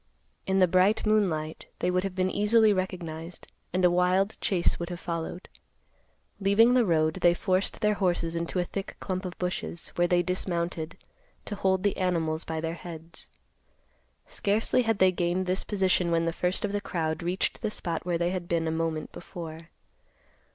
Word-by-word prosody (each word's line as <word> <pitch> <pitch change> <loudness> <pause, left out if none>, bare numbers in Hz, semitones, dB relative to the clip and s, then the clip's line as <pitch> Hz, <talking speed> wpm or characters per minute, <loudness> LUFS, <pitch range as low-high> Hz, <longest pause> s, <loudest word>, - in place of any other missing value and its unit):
In 190 0 +2
the 185 -1 +6
bright 185 +6 +3
moonlight, 175 -8 0
they 180 - 0
would 185 0 +1
have 195 -2 -4
been 185 0 +1
easily 215 +1 +4
recognized, 175 -3 -4 0.2
and 180 +1 +2
a 175 - +5
wild 185 +3 +2
chase 180 -3 +1
would 170 0 -4
have 175 -1 -5
followed. 170 +1 -4 0.9
Leaving 205 +5 +5
the 245 -4 +4
road, 155 -2 +3
they 175 0 +5
forced 185 +4 0
their 210 -1 +3
horses 175 -4 0
into 170 +2 -2
a 180 - +2
thick 195 +3 -5
clump 185 0 -3
of 180 - -6
bushes, 180 -1 -3
where 175 0 +1
they 175 0 +3
dismounted, 170 -2 -2 0.5
to - - -4
hold 190 -2 +1
the 205 - +1
animals 165 -4 0
by 160 0 -3
their 165 +1 -2
heads. 165 -1 -9 1.0
Scarcely 210 +5 +1
had 225 -3 +1
they 190 -1 +5
gained 180 +1 0
this 185 +1 -1
position 190 -3 +1
when 165 0 +2
the 165 - 0
first 180 +4 0
of 205 - -2
the 205 0 -1
crowd 160 -4 -2
reached 175 +3 -1
the 220 - 0
spot 170 -5 -4
where 175 -1 0
they 175 +1 0
had 180 -2 -4
been 165 -1 0
a - - 0
moment 160 -1 -2
before. 165 -2 -9
180 Hz, 180 wpm, -28 LUFS, 170-190 Hz, 1.0 s, the